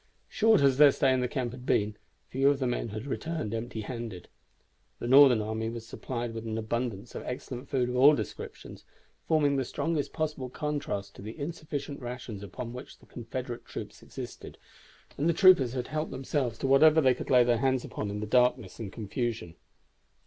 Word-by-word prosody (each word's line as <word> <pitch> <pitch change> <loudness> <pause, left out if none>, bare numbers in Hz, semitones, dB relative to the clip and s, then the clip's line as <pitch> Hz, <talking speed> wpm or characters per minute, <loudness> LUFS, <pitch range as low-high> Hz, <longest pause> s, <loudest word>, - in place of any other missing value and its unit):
Short 220 -3 +4
as 135 -1 +3
their 145 -1 +9
stay 135 -1 +2
in 130 - +1
the 125 - 0
camp 125 -1 -2
had 125 0 -10
been, 105 -4 +1 0.3
few 135 +2 +3
of 140 - +2
the 135 - -2
men 120 -1 -1
had 110 +3 -6
returned 155 -5 -3
empty 115 0 -4
handed. 115 -5 -6 0.7
The - - -5
Northern 130 -4 +7
army 110 +1 -2
was 115 -1 -7
supplied 120 0 -5
with 115 0 -5
an 110 0 -3
abundance 115 -1 -3
of - - -5
excellent 125 +1 -6
food 130 -3 +1
of 125 - -3
all 140 +4 +7
descriptions, - - -7 0.4
forming 145 -3 +3
the 135 - +1
strongest 155 +3 -2
possible 150 -5 -3
contrast 125 -9 -3
to - - -10
the 110 +3 -8
insufficient 145 -2 -5
rations 120 -4 -6
upon 115 +4 -7
which 125 +2 -9
the - - -21
Confederate 120 0 -6
troops - - -8
existed, - - -9 0.6
and 155 +4 +2
the - - +3
troopers 165 -9 +6
had 125 -1 -3
helped 155 +1 -2
themselves 130 -3 -2
to 135 - -2
whatever 155 +4 +6
they 130 -4 +5
could - - -7
lay 125 -1 +6
hands 125 +2 +1
upon 105 - -4
in 105 +1 -4
the - - -2
darkness 125 -3 +2
and 105 -4 -5
confusion. 110 -4 -3
125 Hz, 190 wpm, -29 LUFS, 115-140 Hz, 0.7 s, their